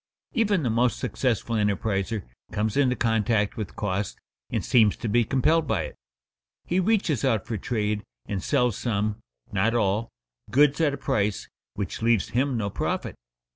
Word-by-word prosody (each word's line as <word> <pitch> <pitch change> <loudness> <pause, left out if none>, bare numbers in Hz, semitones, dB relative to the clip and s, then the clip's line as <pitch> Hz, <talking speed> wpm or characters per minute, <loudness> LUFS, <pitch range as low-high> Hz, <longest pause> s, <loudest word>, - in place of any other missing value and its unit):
Even 205 -7 +2
the 120 - +1
most 120 +2 +2
successful 115 -2 -1
enterpriser 105 0 0 0.3
comes 105 0 -1
into 130 -3 +3
contact 110 -3 +1
with 105 -4 -5
cost, 100 -1 -2 0.3
and - - -2
seems 110 -4 +4
to - - -4
be 120 +3 +3
compelled 145 +7 +2
by - - +1
it. - - -7 0.7
He 180 - +1
reaches 185 - +1
out 115 -7 +1
for 115 - -3
trade, 105 -1 -1 0.2
and 100 -2 -3
sells 125 -4 +1
some 105 -2 -1 0.3
(not 105 +4 +1
all) 110 0 +1 0.4
goods 145 +3 +4
at 145 -3 +2
a - - -10
price 105 -6 -1 0.3
which 100 0 -4
leaves 115 -3 +2
him 130 +1 +1
no 100 -3 -2
profit. - - -2
115 Hz, 160 wpm, -26 LUFS, 105-130 Hz, 0.7 s, seems